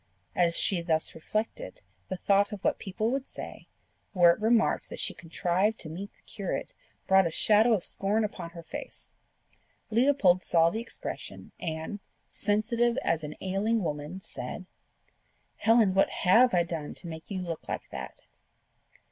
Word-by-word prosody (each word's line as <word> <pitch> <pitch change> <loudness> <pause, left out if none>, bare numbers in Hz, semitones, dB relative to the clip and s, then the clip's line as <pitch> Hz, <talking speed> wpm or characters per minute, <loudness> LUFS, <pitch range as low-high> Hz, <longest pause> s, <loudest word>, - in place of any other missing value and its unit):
As 170 -2 +3
she 185 -4 +3
thus 160 -2 0
reflected, 225 - -4 0.3
the 185 - -3
thought 200 +2 +3
of 205 -2 -7
what - - +1
people 215 +4 -2
would 270 0 -2
say, - - -9 0.5
were 175 -2 +7
it 170 - -3
remarked 225 0 +2
that - - -7
she - - +1
contrived 180 +5 0
to 155 - -4
meet 195 +5 -6
the - - -29
curate, 195 -3 -4 0.3
brought 190 -2 +5
a - - -1
shadow 215 +7 +4
of 195 -5 +1
scorn 210 +3 0
upon 200 -5 -4
her 170 0 -10
face. - - -9 0.8
Leopold 225 -7 +4
saw 165 0 +4
the 220 - -3
expression, 235 - -8
and, 160 +5 -4 0.3
sensitive 235 +3 +1
as 160 -1 0
an 150 0 -6
ailing 200 +3 0
woman, 150 +3 -4
said, - - -6 0.9
"Helen, 225 -4 +4
what 195 - +4
HAVE 230 +7 +4
I 175 - +4
done 165 -3 -5
to 175 - -5
make 160 -1 -8
you 195 -2 -3
look 170 -3 -5
like - - -4
that?" - - -8
190 Hz, 160 wpm, -29 LUFS, 170-220 Hz, 0.9 s, were